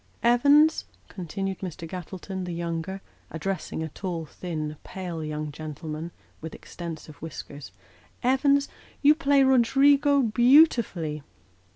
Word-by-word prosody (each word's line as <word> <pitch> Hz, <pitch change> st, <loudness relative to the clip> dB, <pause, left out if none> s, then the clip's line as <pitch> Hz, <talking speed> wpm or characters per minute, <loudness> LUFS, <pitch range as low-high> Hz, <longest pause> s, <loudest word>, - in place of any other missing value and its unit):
" -, -, -30 dB
Evans," 290 Hz, +5 st, +4 dB, 0.2 s
continued 195 Hz, +1 st, -4 dB
Mr. 170 Hz, -3 st, -6 dB
Gattleton, 185 Hz, +2 st, -6 dB
the 175 Hz, -1 st, -5 dB
younger, 170 Hz, +3 st, -4 dB, 0.3 s
addressing 165 Hz, 0 st, -4 dB
a 160 Hz, -, -4 dB
tall, 170 Hz, -1 st, -5 dB
thin, 155 Hz, -2 st, -5 dB
pale 175 Hz, -4 st, -6 dB
young 150 Hz, 0 st, -4 dB
gentleman, 155 Hz, +2 st, -6 dB, 0.3 s
with 160 Hz, 0 st, -7 dB
extensive 160 Hz, -3 st, -9 dB
whiskers, 145 Hz, -, -8 dB, 0.3 s
" -, -, -30 dB
Evans, 280 Hz, +1 st, +3 dB, 0.4 s
you 290 Hz, +1 st, +8 dB
play 285 Hz, -3 st, +3 dB
Roderigo 275 Hz, +2 st, +4 dB
beautifully." 235 Hz, -, +3 dB
180 Hz, 115 wpm, -26 LUFS, 160-260 Hz, 0.4 s, you